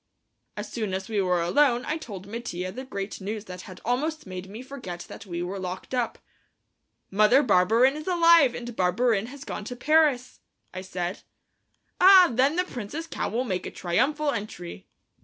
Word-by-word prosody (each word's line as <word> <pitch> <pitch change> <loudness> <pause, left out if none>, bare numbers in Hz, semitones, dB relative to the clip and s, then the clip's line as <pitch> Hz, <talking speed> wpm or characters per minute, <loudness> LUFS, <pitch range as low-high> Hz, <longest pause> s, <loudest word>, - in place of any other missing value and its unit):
As - - -4
soon 215 -5 -3
as 190 +2 -5
we 210 -3 +1
were 180 -2 +1
alone 245 +6 +3
I 310 +2 -2
told 195 - -8
Mattia 195 -4 -5
the 255 +7 -7
great 200 -5 -5
news 210 +2 -5
that 180 -2 -8
had 185 - -10
almost 300 +7 -1
made 185 0 -7
me 220 +5 -8
forget 250 -11 -7
that 205 - -10
we 175 -1 -3
were 190 +2 -4
locked 185 +5 -6
up. 245 -2 -1 0.9
"Mother 215 +8 +5
Barberin 225 +5 +4
is 305 +2 -7
alive, 335 -7 +5
and 240 -1 -7
Barberin 215 +3 +1
has 275 +2 -10
gone - - -5
to 245 - -6
Paris!" 290 -1 +2 0.3
I 185 - -5
said. 185 0 -4 0.8
"Ah, 370 -3 +8
then 265 +6 +3
the 360 - +2
Prince's 275 - -6
cow - - -3
will 240 +3 -1
make 185 -7 -3
a - - -7
triumphal 290 - 0
entry." 90 - -6
225 Hz, 175 wpm, -26 LUFS, 185-275 Hz, 0.9 s, Ah